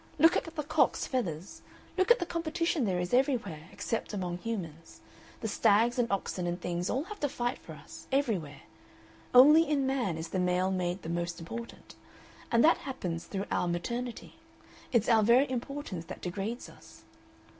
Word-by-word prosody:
Look 325 Hz, +3 st, +6 dB
at -, -, 0 dB
the 325 Hz, -2 st, -5 dB
cock's 290 Hz, -, +2 dB
feathers, 185 Hz, -, -3 dB, 0.3 s
look 375 Hz, +2 st, +2 dB
at 480 Hz, -, +7 dB
the 350 Hz, -, -2 dB
competition 335 Hz, -4 st, -1 dB
there 185 Hz, -3 st, 0 dB
is 180 Hz, +3 st, -3 dB
everywhere, 230 Hz, -, 0 dB
except 225 Hz, -2 st, -3 dB
among 180 Hz, -2 st, -3 dB
humans. 170 Hz, -8 st, -6 dB, 0.4 s
The 225 Hz, -, -2 dB
stags 230 Hz, +4 st, +3 dB
and 235 Hz, -2 st, +1 dB
oxen 185 Hz, -2 st, -2 dB
and 175 Hz, +1 st, -2 dB
things 175 Hz, 0 st, -2 dB
all 265 Hz, -, 0 dB
have 415 Hz, +4 st, -9 dB
to 290 Hz, -, 0 dB
fight 245 Hz, +1 st, -2 dB
for -, -, -11 dB
us, -, -, -12 dB
everywhere. 220 Hz, -, -1 dB, 0.7 s
Only 300 Hz, +5 st, +8 dB
in 285 Hz, -3 st, +2 dB
man 250 Hz, -11 st, 0 dB
is 160 Hz, +1 st, -5 dB
the 185 Hz, -, -1 dB
male 180 Hz, +1 st, +1 dB
made 180 Hz, 0 st, -2 dB
the 160 Hz, -, -5 dB
most 170 Hz, 0 st, -2 dB
important. 230 Hz, +8 st, -8 dB, 0.6 s
And 235 Hz, 0 st, +4 dB
that 330 Hz, -, +6 dB
happens 180 Hz, -11 st, -5 dB
through 195 Hz, 0 st, -4 dB
our -, -, +1 dB
maternity; 235 Hz, +8 st, -4 dB, 0.5 s
it's 235 Hz, -3 st, +2 dB
our 225 Hz, -2 st, +5 dB
very 240 Hz, +6 st, +5 dB
importance 250 Hz, -, -4 dB
that -, -, -8 dB
degrades 200 Hz, +6 st, -4 dB
us. -, -, -16 dB
225 Hz, 175 wpm, -30 LUFS, 180-270 Hz, 0.7 s, Only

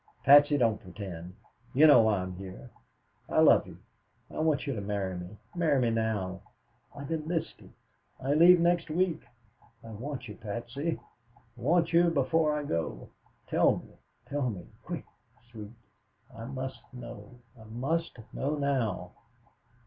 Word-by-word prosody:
"Patsy, 145 Hz, +1 st, +7 dB
don't 115 Hz, -5 st, +1 dB
pretend. 90 Hz, -2 st, -8 dB, 0.4 s
You 150 Hz, +4 st, +7 dB
know 145 Hz, -6 st, +8 dB
why 110 Hz, -4 st, +2 dB
I'm 90 Hz, 0 st, -6 dB
here. 95 Hz, +6 st, -10 dB, 0.6 s
I -, -, +2 dB
love -, -, +6 dB
you. -, -, -11 dB, 0.5 s
I -, -, -6 dB
want 155 Hz, -2 st, +1 dB
you 140 Hz, -, -2 dB
to 105 Hz, -, -4 dB
marry 100 Hz, -2 st, -2 dB
me, 90 Hz, +4 st, -8 dB, 0.2 s
marry 160 Hz, -6 st, +2 dB
me 120 Hz, -2 st, +2 dB
now. 105 Hz, -5 st, -1 dB, 0.5 s
I've 140 Hz, +2 st, -7 dB
enlisted. 165 Hz, +1 st, -3 dB, 0.5 s
I 135 Hz, +2 st, 0 dB
leave 175 Hz, +3 st, +7 dB
next 170 Hz, 0 st, +2 dB
week. 175 Hz, +1 st, 0 dB, 0.6 s
I 115 Hz, -, -10 dB
want 125 Hz, +4 st, -6 dB
you, 105 Hz, -, -9 dB
Patsy; 120 Hz, +9 st, -4 dB, 0.6 s
want 165 Hz, +7 st, +1 dB
you 170 Hz, +1 st, +6 dB
before 150 Hz, +1 st, +1 dB
I 150 Hz, -, -3 dB
go. 80 Hz, -, -3 dB, 0.4 s
Tell -, -, +3 dB
me, -, -, -12 dB, 0.3 s
tell 140 Hz, -3 st, -1 dB
me, 95 Hz, -6 st, -7 dB, 0.2 s
quick, -, -, -6 dB, 0.5 s
Sweet 105 Hz, -3 st, -8 dB, 0.7 s
I 115 Hz, 0 st, -7 dB
must 130 Hz, +1 st, -6 dB
know, 125 Hz, 0 st, -10 dB, 0.2 s
I 110 Hz, -2 st, -15 dB
must 135 Hz, +9 st, -2 dB, 0.2 s
know 145 Hz, +3 st, -1 dB
now." 130 Hz, -11 st, -1 dB
130 Hz, 145 wpm, -29 LUFS, 105-150 Hz, 0.7 s, know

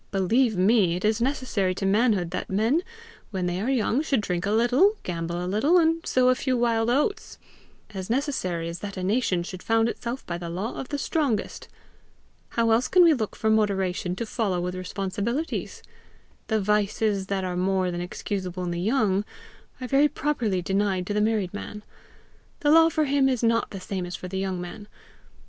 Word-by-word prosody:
Believe 215 Hz, +4 st, +2 dB
me, 190 Hz, -2 st, +3 dB
it 180 Hz, -, -3 dB
is 215 Hz, +2 st, +1 dB
necessary 240 Hz, -8 st, 0 dB
to 195 Hz, -, -3 dB
manhood 200 Hz, -3 st, +2 dB
that -, -, -4 dB
men 225 Hz, -, +2 dB, 0.5 s
when 190 Hz, -4 st, -2 dB
they 180 Hz, +1 st, -2 dB
are 230 Hz, -, -1 dB
young 255 Hz, 0 st, +1 dB
should 280 Hz, -5 st, +1 dB
drink 180 Hz, -2 st, -2 dB
a -, -, 0 dB
little, 250 Hz, -, +3 dB
gamble 170 Hz, -1 st, -3 dB
a 180 Hz, -, -3 dB
little, 220 Hz, -, +3 dB
and 330 Hz, -1 st, +2 dB
sow 255 Hz, 0 st, +3 dB
a -, -, +6 dB
few 255 Hz, 0 st, -1 dB
wild 230 Hz, -1 st, +1 dB
oats 300 Hz, -, 0 dB, 0.6 s
as 190 Hz, 0 st, -6 dB
necessary 225 Hz, -, -1 dB
as 170 Hz, +1 st, -5 dB
that 200 Hz, -1 st, -7 dB
a 185 Hz, -, -3 dB
nation 195 Hz, -3 st, +1 dB
should 185 Hz, +1 st, -8 dB
found 225 Hz, 0 st, +2 dB
itself 240 Hz, +2 st, -5 dB
by 170 Hz, 0 st, -4 dB
the 170 Hz, -1 st, -6 dB
law 190 Hz, +7 st, -3 dB
of 265 Hz, -, -6 dB
the 290 Hz, -, -2 dB
strongest. 280 Hz, -, -1 dB, 0.8 s
How 230 Hz, -1 st, +1 dB
else 230 Hz, +3 st, +3 dB
can 365 Hz, -1 st, +5 dB
we 335 Hz, -2 st, +6 dB
look 220 Hz, -7 st, -3 dB
for 220 Hz, -, 0 dB
the -, -, +5 dB
moderation 190 Hz, -4 st, 0 dB
to 230 Hz, -, -3 dB
follow 210 Hz, -5 st, -1 dB
with 180 Hz, +1 st, -2 dB
responsibilities? 200 Hz, -, -3 dB, 0.6 s
The 220 Hz, -1 st, +1 dB
vices 210 Hz, -1 st, 0 dB
that 195 Hz, -1 st, -1 dB
are 180 Hz, -1 st, -3 dB
more 185 Hz, 0 st, +1 dB
than 175 Hz, 0 st, -4 dB
excusable 185 Hz, 0 st, -4 dB
in 175 Hz, -, -2 dB
the 170 Hz, 0 st, -3 dB
young, 205 Hz, -2 st, +1 dB, 0.6 s
are 255 Hz, -, -5 dB
very 275 Hz, +3 st, +4 dB
properly 235 Hz, -12 st, -1 dB
denied 195 Hz, -1 st, 0 dB
to 205 Hz, -, -3 dB
the 210 Hz, -, +1 dB
married 210 Hz, -4 st, 0 dB
man; 210 Hz, 0 st, -7 dB, 0.8 s
the 290 Hz, -, +3 dB
law 325 Hz, +1 st, +7 dB
for 310 Hz, -2 st, +1 dB
him 275 Hz, -1 st, +3 dB
is 250 Hz, -3 st, -1 dB
not 230 Hz, 0 st, +2 dB
the 195 Hz, -, -7 dB
same 185 Hz, -1 st, -4 dB
as 175 Hz, -, -5 dB
for 180 Hz, -, -7 dB
the 190 Hz, +1 st, -4 dB
young 190 Hz, -2 st, -2 dB
man. 180 Hz, +4 st, -8 dB
210 Hz, 200 wpm, -25 LUFS, 185-250 Hz, 0.8 s, law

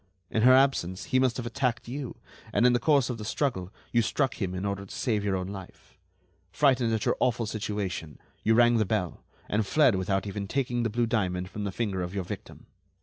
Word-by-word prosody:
In 110 Hz, -, +1 dB
her 130 Hz, +3 st, +7 dB
absence, 130 Hz, -10 st, +2 dB
he 130 Hz, -, +1 dB
must 130 Hz, -2 st, +2 dB
have 125 Hz, -, -4 dB
attacked 120 Hz, -1 st, -1 dB
you, 130 Hz, +1 st, -5 dB, 0.3 s
and 120 Hz, -, +3 dB
in 125 Hz, -, +6 dB
the 120 Hz, -, +3 dB
course 140 Hz, -4 st, +3 dB
of 115 Hz, -, -6 dB
the -, -, -5 dB
struggle 105 Hz, -5 st, -2 dB, 0.2 s
you 120 Hz, -, +4 dB
struck 130 Hz, +1 st, -1 dB
him 95 Hz, -2 st, -1 dB
in 95 Hz, +2 st, -3 dB
order 100 Hz, 0 st, -2 dB
to 100 Hz, -, -13 dB
save 110 Hz, -5 st, -1 dB
your 100 Hz, -2 st, 0 dB
own 95 Hz, 0 st, -3 dB
life. 95 Hz, -2 st, -10 dB, 0.6 s
Frightened 130 Hz, -5 st, +3 dB
at 110 Hz, -2 st, 0 dB
your -, -, +2 dB
awful 120 Hz, -2 st, +1 dB
situation, 100 Hz, -8 st, -4 dB, 0.2 s
you 110 Hz, +1 st, +3 dB
rang 120 Hz, 0 st, +5 dB
the 110 Hz, -, +3 dB
bell, 95 Hz, -4 st, -2 dB, 0.2 s
and 110 Hz, +1 st, +1 dB
fled 135 Hz, +4 st, +4 dB
without 95 Hz, +1 st, 0 dB
even 100 Hz, 0 st, -4 dB
taking 125 Hz, 0 st, -1 dB
the 115 Hz, -, 0 dB
blue 120 Hz, +3 st, +1 dB
diamond 90 Hz, -5 st, -1 dB
from 105 Hz, -1 st, -4 dB
the 100 Hz, -, -2 dB
finger 100 Hz, -3 st, -2 dB
of 90 Hz, +2 st, -4 dB
your 95 Hz, -, -1 dB
victim. -, -, -8 dB
110 Hz, 220 wpm, -28 LUFS, 95-125 Hz, 0.6 s, her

